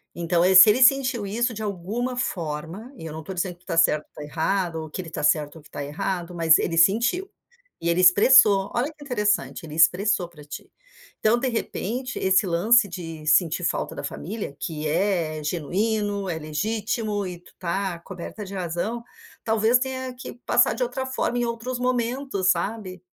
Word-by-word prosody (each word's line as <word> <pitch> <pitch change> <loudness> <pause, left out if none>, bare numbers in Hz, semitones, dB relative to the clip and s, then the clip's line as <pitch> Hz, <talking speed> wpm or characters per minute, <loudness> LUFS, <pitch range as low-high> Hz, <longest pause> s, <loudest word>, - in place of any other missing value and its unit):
Então, 170 0 +1
eh, 190 +1 +4
se 185 +3 +10
ele 240 +5 +4
sentiu 255 -4 +4
isso, 235 +4 -1
de 220 - -6
alguma 215 +6 -3
forma, 175 - -4
e 165 - -8
eu 160 - -6
não 160 - -6
tô 190 - -6
dizendo 180 0 -3
que 175 - -31
tu - - -45
tá 165 - -2
certa 150 -2 +3
ou - - -62
tá - - -9
errada, 165 +3 -1
ou 160 -1 -7
que 185 - -5
ele 175 - -8
tá - - -5
certo, 150 0 +1
ou 160 - -12
que 145 - -20
tá 145 - -5
errado, 175 +4 -4
mas 165 -2 +5
ele 165 - -2
sentiu. 235 - +3 0.5
E, 170 - -2
ele 170 +1 +2
expressou. 200 +1 +6
Olha 265 +6 -1
que 300 - -19
interessante, 210 -8 -1
ele 155 -2 -8
expressou 180 +3 +3
pra 150 -4 -15
ti. 150 - -10 0.5
Então, 220 +2 +3
de 260 - 0
repente, 245 +1 -3
esse 190 +2 +3
lance 205 +7 +4
de 165 -4 -8
sentir 165 +2 +2
falta - - -2
da - - -7
família, 200 -5 -6
que 155 -2 -4
é 160 -2 0
genuíno, 200 +6 -1
é 165 -2 -2
legítimo 210 +6 -2
e 180 -1 -6
tu 175 - -20
tá 185 0 -2
coberta 195 +4 -8
de 200 0 -9
razão, 185 +6 -3 0.4
talvez 220 +2 +3
tenha 260 0 -4
que 250 - -9
passar - - +4
de - - -3
outra 265 - -2
forma, 250 -2 -1
em 240 - +1
outros 235 +2 -4
momentos, 250 -5 0
sabe. 185 0 -3
195 Hz, 195 wpm, -24 LUFS, 170-230 Hz, 0.5 s, se